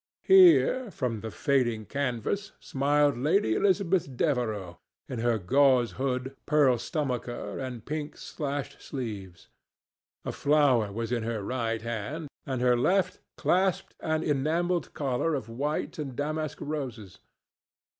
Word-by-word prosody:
Here, 350 Hz, -, +6 dB
from 125 Hz, -, -3 dB
the 110 Hz, -, -5 dB
fading 120 Hz, -4 st, 0 dB
canvas, 140 Hz, -, -2 dB
smiled 145 Hz, 0 st, +2 dB
Lady 150 Hz, -, +2 dB
Elizabeth 185 Hz, -, +1 dB
Devereux, 110 Hz, -, -1 dB, 0.3 s
in 125 Hz, -, -5 dB
her 120 Hz, 0 st, +2 dB
gauze 130 Hz, +4 st, +3 dB
hood, 130 Hz, 0 st, -2 dB
pearl 140 Hz, -5 st, +4 dB
stomacher, 125 Hz, -3 st, -3 dB
and 125 Hz, -4 st, -6 dB
pink 150 Hz, 0 st, -4 dB
slashed 145 Hz, -2 st, -5 dB
sleeves. 105 Hz, -, -7 dB, 0.8 s
A -, -, -2 dB
flower 140 Hz, -8 st, +3 dB
was 115 Hz, +2 st, -4 dB
in 120 Hz, -2 st, 0 dB
her 110 Hz, -2 st, -3 dB
right 115 Hz, -1 st, -2 dB
hand, 120 Hz, +7 st, -4 dB, 0.2 s
and 130 Hz, -2 st, -2 dB
her 125 Hz, -1 st, +5 dB
left 180 Hz, +9 st, +1 dB, 0.2 s
clasped 185 Hz, 0 st, +1 dB
an 160 Hz, 0 st, -1 dB
enamelled 165 Hz, +4 st, 0 dB
collar 140 Hz, +3 st, 0 dB
of 115 Hz, -5 st, -5 dB
white 145 Hz, +7 st, -3 dB
and 135 Hz, -4 st, -4 dB
damask 155 Hz, +2 st, -2 dB
roses. 125 Hz, -, -5 dB
135 Hz, 125 wpm, -28 LUFS, 120-155 Hz, 0.8 s, Here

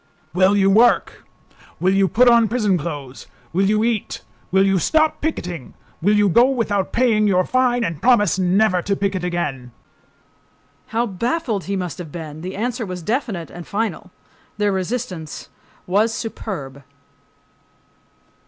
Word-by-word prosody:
"Will 190 Hz, +3 st, +3 dB
you 195 Hz, -1 st, +3 dB
work?"—"Will 200 Hz, -4 st, 0 dB
you 195 Hz, 0 st, +3 dB
put 245 Hz, +6 st, +3 dB
on 235 Hz, -2 st, +6 dB
prison 215 Hz, -4 st, +1 dB
clothes?"—"Will 145 Hz, +2 st, -4 dB
you 215 Hz, +1 st, +2 dB
eat?"—"Will 190 Hz, -, -1 dB
you 195 Hz, -1 st, +2 dB
stop 310 Hz, -, +1 dB
picketing?"—"Will 180 Hz, -, -3 dB
you 210 Hz, 0 st, +4 dB
go 235 Hz, +8 st, +5 dB
without 210 Hz, -7 st, -1 dB
paying 225 Hz, -4 st, +2 dB
your 185 Hz, -2 st, +2 dB
fine 250 Hz, -2 st, +1 dB
and 165 Hz, -8 st, -3 dB
promise 210 Hz, -7 st, +3 dB
never 185 Hz, 0 st, +2 dB
to 200 Hz, +2 st, -1 dB
picket 195 Hz, -2 st, -2 dB
again?" 150 Hz, -8 st, -3 dB, 1.2 s
How 230 Hz, +2 st, 0 dB
baffled 230 Hz, -, -2 dB
he 200 Hz, -, -2 dB
must 180 Hz, -2 st, -4 dB
have 165 Hz, -4 st, -8 dB
been! 155 Hz, -2 st, -8 dB
The 185 Hz, +2 st, -6 dB
answer 240 Hz, +3 st, -2 dB
was 180 Hz, -4 st, -6 dB
definite 215 Hz, -, -3 dB
and 175 Hz, -1 st, -10 dB
final. 205 Hz, -3 st, -3 dB, 0.5 s
Their 205 Hz, -1 st, +1 dB
resistance 190 Hz, -5 st, -4 dB, 0.4 s
was 210 Hz, +5 st, +2 dB
superb. 160 Hz, -, -6 dB
195 Hz, 135 wpm, -20 LUFS, 175-230 Hz, 1.2 s, on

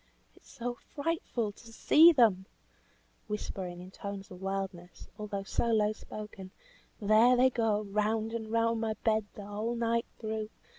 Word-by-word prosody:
"It -, -, -21 dB
is -, -, -24 dB
so 245 Hz, +1 st, -4 dB, 0.2 s
frightful 285 Hz, -8 st, -1 dB
to 230 Hz, +3 st, -15 dB
see 320 Hz, +8 st, +7 dB
them," 215 Hz, -, +3 dB, 0.8 s
whispering 190 Hz, -4 st, -4 dB
in 180 Hz, +1 st, -10 dB
tones 200 Hz, 0 st, -7 dB
of 180 Hz, 0 st, -10 dB
wildness, 190 Hz, -2 st, -5 dB
although 205 Hz, -2 st, -4 dB
so 215 Hz, -, -1 dB
low 215 Hz, -2 st, +3 dB
spoken. 210 Hz, -3 st, -9 dB, 0.5 s
"There 220 Hz, +4 st, +5 dB
they 260 Hz, +1 st, +5 dB
go 220 Hz, -3 st, +1 dB
round 215 Hz, +2 st, -1 dB
and 220 Hz, -1 st, -4 dB
round 230 Hz, 0 st, +2 dB
my 220 Hz, -1 st, -1 dB
bed 220 Hz, -2 st, +2 dB
the 205 Hz, -, -8 dB
whole 215 Hz, +3 st, -3 dB
night 230 Hz, 0 st, 0 dB
through. 220 Hz, -1 st, -4 dB
215 Hz, 155 wpm, -31 LUFS, 200-230 Hz, 0.8 s, see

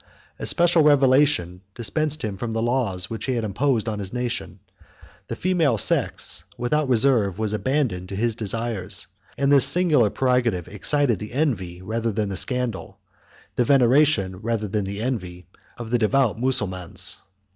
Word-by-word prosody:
A -, -, -3 dB
special 170 Hz, -1 st, +3 dB
revelation 135 Hz, -, +3 dB
dispensed 145 Hz, +7 st, -1 dB
him 105 Hz, -3 st, -3 dB
from 115 Hz, +3 st, -5 dB
the 115 Hz, -, -1 dB
laws 115 Hz, -7 st, -1 dB
which 115 Hz, +1 st, -6 dB
he 130 Hz, -, -1 dB
had 115 Hz, -, -2 dB
imposed 115 Hz, +2 st, 0 dB
on 105 Hz, -2 st, -3 dB
his 100 Hz, -2 st, -5 dB
nation: 125 Hz, -1 st, -4 dB, 0.7 s
the -, -, -4 dB
female 165 Hz, -10 st, +1 dB
sex, 85 Hz, -, +1 dB
without 140 Hz, +4 st, 0 dB
reserve, 115 Hz, -6 st, +3 dB
was 110 Hz, -1 st, -1 dB
abandoned 105 Hz, -5 st, -1 dB
to 100 Hz, -, -5 dB
his 115 Hz, +3 st, 0 dB
desires; 110 Hz, -3 st, -2 dB, 0.3 s
and 140 Hz, +2 st, +1 dB
this 140 Hz, -3 st, +6 dB
singular 155 Hz, -, +3 dB
prerogative 120 Hz, -8 st, 0 dB
excited 120 Hz, +1 st, +1 dB
the 105 Hz, +2 st, -8 dB
envy, 95 Hz, -, -2 dB
rather 115 Hz, +3 st, -2 dB
than 105 Hz, -1 st, -2 dB
the 95 Hz, -, -4 dB
scandal, 125 Hz, -2 st, -1 dB, 0.6 s
the 125 Hz, -, +3 dB
veneration, 125 Hz, -6 st, +3 dB
rather 110 Hz, +1 st, -2 dB
than 105 Hz, 0 st, -2 dB
the 100 Hz, +2 st, -5 dB
envy, 90 Hz, -8 st, -4 dB, 0.3 s
of 115 Hz, -2 st, -7 dB
the 120 Hz, -, +2 dB
devout 120 Hz, +1 st, +2 dB
Mussulmans. 95 Hz, -9 st, -2 dB
115 Hz, 155 wpm, -23 LUFS, 100-135 Hz, 0.7 s, this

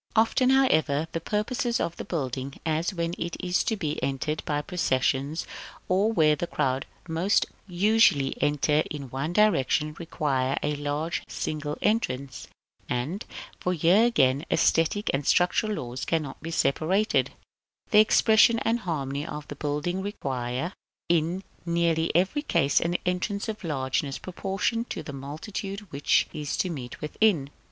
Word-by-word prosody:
Often, 230 Hz, +3 st, +3 dB
however, 160 Hz, -, +3 dB
the 165 Hz, -, -3 dB
purposes 235 Hz, +5 st, -1 dB
of 170 Hz, -, -2 dB
the -, -, -5 dB
building, 135 Hz, -4 st, -4 dB
as 160 Hz, +3 st, 0 dB
when 170 Hz, -2 st, -2 dB
it 170 Hz, 0 st, -3 dB
is 180 Hz, 0 st, +1 dB
to 220 Hz, -, +1 dB
be 155 Hz, -5 st, -3 dB
entered 140 Hz, +3 st, -2 dB
by 145 Hz, 0 st, -1 dB
processions, 140 Hz, -3 st, 0 dB, 0.4 s
or 195 Hz, +4 st, +2 dB
where 155 Hz, -7 st, +4 dB
the 170 Hz, +4 st, -3 dB
crowd 135 Hz, -4 st, -1 dB, 0.2 s
most 170 Hz, +5 st, +2 dB, 0.2 s
usually 185 Hz, -6 st, +3 dB
enter 150 Hz, +1 st, +2 dB
in 140 Hz, -4 st, -6 dB
one 140 Hz, +5 st, -2 dB
direction, 165 Hz, -6 st, +2 dB
require 135 Hz, -5 st, -1 dB
the 150 Hz, 0 st, 0 dB
large 145 Hz, +3 st, -2 dB
single 150 Hz, -1 st, -3 dB
entrance; 140 Hz, -, -1 dB, 0.4 s
and 140 Hz, -, -2 dB, 0.3 s
(for 180 Hz, -, 0 dB
here 175 Hz, +7 st, +5 dB
again 140 Hz, -, +3 dB
the -, -, +2 dB
æsthetic 165 Hz, +6 st, +2 dB
and 135 Hz, +1 st, -1 dB
structural 195 Hz, +4 st, +3 dB
laws 125 Hz, -7 st, -5 dB
cannot 155 Hz, -5 st, -2 dB
be 165 Hz, -, -6 dB
separated) 170 Hz, +6 st, +1 dB, 0.6 s
the 210 Hz, -, +7 dB
expression 220 Hz, +1 st, +5 dB
and 230 Hz, +1 st, +1 dB
harmony 145 Hz, -, -3 dB
of 150 Hz, -2 st, -7 dB
the 145 Hz, -, -6 dB
building 150 Hz, +6 st, -2 dB
require, 135 Hz, -5 st, -3 dB, 0.4 s
in 170 Hz, +3 st, +1 dB, 0.2 s
nearly 170 Hz, -1 st, +1 dB
every 190 Hz, -, +2 dB
case, 140 Hz, -, +2 dB
an 175 Hz, +1 st, +1 dB
entrance 180 Hz, +4 st, -1 dB
of 215 Hz, -2 st, -5 dB
largeness 135 Hz, -2 st, -1 dB
proportioned 195 Hz, +5 st, -2 dB
to -, -, -4 dB
the 145 Hz, -, -7 dB
multitude 190 Hz, +9 st, -6 dB
which 140 Hz, +1 st, +2 dB
is 150 Hz, -2 st, -3 dB
to 185 Hz, -, 0 dB
meet 125 Hz, -6 st, -7 dB
within. 150 Hz, -3 st, +1 dB
160 Hz, 145 wpm, -27 LUFS, 145-195 Hz, 0.6 s, the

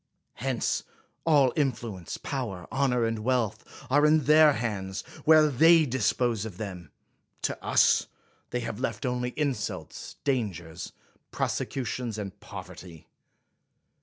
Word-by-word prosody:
Hence, 115 Hz, -, -1 dB, 0.5 s
all 140 Hz, -5 st, +5 dB
influ 120 Hz, -, -1 dB
ence, 85 Hz, -, -6 dB
power, 115 Hz, -10 st, -4 dB
honor, 125 Hz, -3 st, +2 dB
and 115 Hz, -1 st, -1 dB
wealth, 110 Hz, -2 st, 0 dB, 0.2 s
are 145 Hz, +4 st, +3 dB
in 155 Hz, 0 st, +5 dB
their 150 Hz, +2 st, +6 dB
hands, 100 Hz, -5 st, -3 dB
or -, -, -16 dB
where 155 Hz, -1 st, +7 dB
they 160 Hz, +4 st, +6 dB
dispose 120 Hz, -3 st, 0 dB
of 105 Hz, -5 st, -7 dB
them; 95 Hz, -5 st, -7 dB, 0.5 s
to -, -, -2 dB
us -, -, +4 dB, 0.4 s
they 125 Hz, -, -2 dB
have 110 Hz, -1 st, -5 dB
left 115 Hz, -3 st, -3 dB
only 125 Hz, 0 st, -1 dB
insults, 140 Hz, -8 st, -3 dB
dangers, 90 Hz, -, -2 dB, 0.4 s
prosecutions, 120 Hz, -3 st, -2 dB
and 100 Hz, -3 st, -6 dB
poverty. 90 Hz, -3 st, -10 dB
120 Hz, 125 wpm, -28 LUFS, 100-135 Hz, 0.5 s, where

